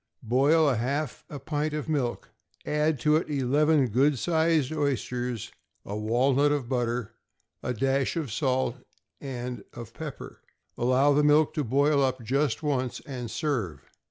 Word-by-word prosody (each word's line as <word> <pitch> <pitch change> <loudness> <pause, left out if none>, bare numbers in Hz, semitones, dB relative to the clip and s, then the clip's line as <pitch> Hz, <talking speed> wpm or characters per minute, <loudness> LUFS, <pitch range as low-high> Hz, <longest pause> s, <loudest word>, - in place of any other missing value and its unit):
= - - -31
Boil 140 +5 +3
half 135 +4 -2
a 145 - -6
pint 150 +2 -2
of 150 - -4
milk; 140 -6 -2 0.3
add 150 -1 +1
to 150 +4 +4
it 160 - -3
eleven 145 +1 +3
good 135 +5 +2
sized 160 -2 +1
oysters, 125 -5 -2 0.3
a 100 - -5
walnut 130 +7 +2
of 145 -5 -1
butter, 120 -3 -1 0.5
a - - -2
dash 135 +5 0
of 155 -8 -3
salt 130 0 0 0.4
and 125 -2 -5
of 120 -1 -9
pepper. 155 -4 -8 0.3
Allow 130 +4 +3
the 150 +1 +3
milk 150 +1 +4
to 150 - -1
boil 140 +4 +2
up 130 -2 0
just 140 +4 0
once, 130 -4 -1
and 125 -4 -6
serve. 110 - -2
135 Hz, 150 wpm, -27 LUFS, 125-150 Hz, 0.5 s, to